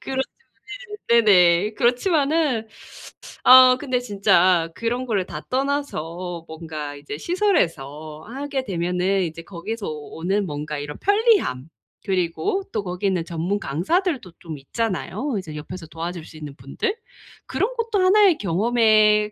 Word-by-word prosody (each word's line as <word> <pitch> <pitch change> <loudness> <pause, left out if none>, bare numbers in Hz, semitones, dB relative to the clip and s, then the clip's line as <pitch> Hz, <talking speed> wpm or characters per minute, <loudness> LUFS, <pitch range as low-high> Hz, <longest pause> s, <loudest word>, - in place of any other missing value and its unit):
그렇죠. 265 0 -2 0.9
네. 235 0 +6
네네. 185 0 +4
그렇지만은 280 - +1 0.8
어 255 0 +9
근데 255 -2 -1
진짜 185 -6 +3
그런 240 +2 -2
거를 205 -6 0
다 - - -7
떠나서 180 - -3
뭔가 155 -2 -7
이제 145 0 -7
시설에서 155 - -1
하게 275 +2 -4
되면은 180 +1 0
이제 165 -1 -5
거기서 200 +5 -6
오 150 -1 -7
오는 195 +4 0
뭔가 150 0 -4
이런 145 +1 -6
편리함, 405 - +2 0.4
그리고 195 - -1
또 - - -2
거기 180 +1 -5
있는 185 -3 0
전문 170 +4 -2
강사들도 240 - -1
좀 160 -3 -7
있잖아요. 225 - -3
이제 160 -5 -6
옆에서 165 +4 -8
도와줄 165 0 -6
수 155 - -13
있는 145 -3 -8
분들. 140 - -3 0.5
그런 415 - -1
것도 455 -3 0
하나의 385 -2 +5
경험의 215 +2 +3
195 Hz, 290 characters per minute, -22 LUFS, 165-255 Hz, 0.9 s, 어